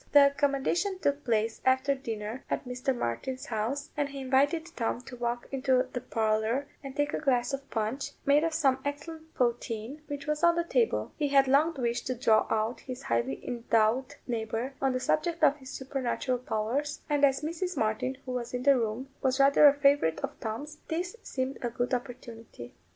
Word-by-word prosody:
The 280 -1 +8
accommodation 285 +8 0
took 285 -4 0
place 225 -2 0
after 260 +2 +3
dinner 225 -3 -5
at - - -2
Mr. 250 +1 -2
Martin's 245 - -3
house, 240 +6 -3
and 290 -1 0
he 275 0 -7
invited 285 +6 +1
Tom 235 0 -1
to 250 0 -10
walk 240 0 -3
into 260 -1 +2
the 245 - -3
parlour 225 +2 0 0.2
and 275 -1 -7
take 290 0 0
a - - 0
glass 255 -3 +1
of 275 0 -5
punch, 250 +6 -2
made 290 +2 +5
of 330 - +1
some 275 -5 +2
excellent 315 +3 -6
poteen, 240 +2 -1
which 285 -1 -5
was 300 0 -1
on 340 0 +6
the 340 - +1
table: 460 +7 +1
he 295 - +1
had 275 -1 +4
long 300 +5 +3
wished 240 -2 -1
to 255 - -1
draw 225 -3 +3
out 220 +2 0
his 255 -1 -8
highly 120 +3 -1
endowed 235 +1 +1
neighbour 230 +2 -3
on 270 -1 +2
the 255 - 0
subject 330 +5 0
of 290 -1 +5
his 260 -2 -11
supernatural 260 -2 -2
powers, 250 +3 -2
and 290 -2 0
as 270 -1 +4
Mrs. 340 +4 -3
Martin, 255 +5 0
who 255 - -4
was 250 -1 -3
in 250 - -3
the 275 -2 +5
room, 230 +3 -2
was 260 0 +1
rather 280 +2 +7
a 280 - +7
favourite 280 - +3
of - - -2
Tom's, 285 +8 -5
this 350 +5 -3
seemed 260 -5 -3
a 240 - -1
good 245 +2 -2
opportunity. 235 - -6
265 Hz, 190 wpm, -29 LUFS, 235-285 Hz, 0.2 s, The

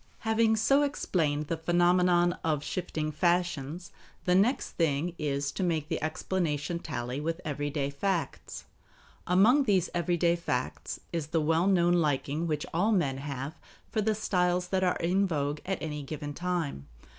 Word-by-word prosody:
Having 220 0 +3
so 275 +7 +3
explained 160 - 0
the 165 - -2
phenomenon 175 +1 +3
of 150 -3 0
shifting 155 -4 -3
fashions, 175 -1 0 0.3
the 180 - +3
next 210 +9 +2
thing 165 +1 0
is 140 -2 -1
to - - -5
make 160 -4 0
the 165 - -2
explanation 160 -1 -1
tally 125 -3 -4
with 165 +2 -2
everyday 145 -1 -2
facts. 175 +4 -3 0.6
Among 225 +11 +5
these 195 -6 +2
everyday 175 -1 +2
facts 170 - -3
is 165 -3 -2
the 165 +1 0
well 160 +4 +2
known 175 -3 +4
liking 155 -1 0
which 150 -2 -1
all 195 +7 +2
men 145 -10 +1
have 140 +1 -5 0.4
for 215 - 0
the 215 +1 +1
styles 180 -3 0
that 190 0 +1
are 180 - +2
in 190 +4 +1
vogue 145 -3 -1
at 190 -1 -1
any 150 -2 -3
given 145 +1 -6
time. 170 - -3
170 Hz, 155 wpm, -29 LUFS, 150-180 Hz, 0.6 s, Among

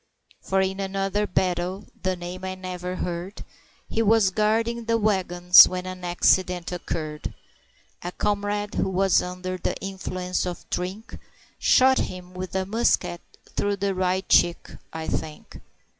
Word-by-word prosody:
For 190 0 +1
in 190 +1 -1
another 195 +1 -1
battle 185 +2 -1 0.2
the 185 0 0
name 180 +1 -7
I 185 0 -3
never 180 -1 -5
heard 180 +3 -5 0.4
He 225 - -1
was 220 -3 +4
guarding 225 +3 0
the 230 0 +2
wagons 180 -4 +6
when 180 0 -4
an 185 0 -7
accident 180 0 +2
occurred, 155 -3 -5 0.7
A 175 - -4
comrade, 205 +1 -1
who 195 - 0
was 190 0 +3
under 180 0 -5
the - - -2
influence 185 -1 -3
of 175 - -6
drink, 185 +5 -4 0.4
Shot 260 +1 +5
him 180 0 -5
with 185 +1 -6
a 190 0 0
musket 210 -4 +1 0.3
through 205 0 0
the 200 0 -1
right 185 0 0
cheek, 175 -1 +3 0.2
I 160 0 -5
think. 155 -1 -5
185 Hz, 145 wpm, -25 LUFS, 180-200 Hz, 0.7 s, wagons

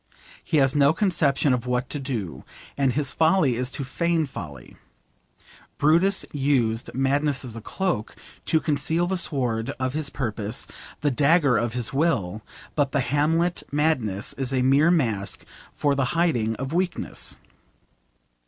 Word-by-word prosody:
He 155 - 0
has 135 -1 +3
no 145 +1 +5
conception 155 -8 +2
of 125 -1 -2
what 125 0 0
to 145 - -2
do, 120 - -4 0.3
and 135 -2 +2
his 140 -1 0
folly 160 -2 +3
is 125 +1 -2
to 140 - -2
feign 170 +3 0
folly. 75 - -9 1.0
Brutus 170 +7 +3
used 130 -6 0
madness 140 +1 +1
as 115 -3 -6
a 115 - -7
cloak 155 - -2 0.3
to 160 - +3
conceal 160 +3 +1
the 190 +2 -1
sword 125 -9 0
of 130 0 -1
his 155 -2 -2
purpose, 110 -2 -3 0.4
the 145 -1 +2
dagger 145 0 +4
of 115 0 0
his 120 -1 -1
will, 115 - 0 0.3
but 140 -2 0
the 140 - +2
Hamlet 160 +6 +1
madness 135 -10 0
is 135 -1 0
a 130 -1 +1
mere 140 +5 +4
mask 115 - 0 0.3
for 145 -1 0
the 140 -1 +1
hiding 120 -10 +1
of 135 +5 -5
weakness. 180 +1 -2
140 Hz, 150 wpm, -24 LUFS, 125-155 Hz, 1.0 s, no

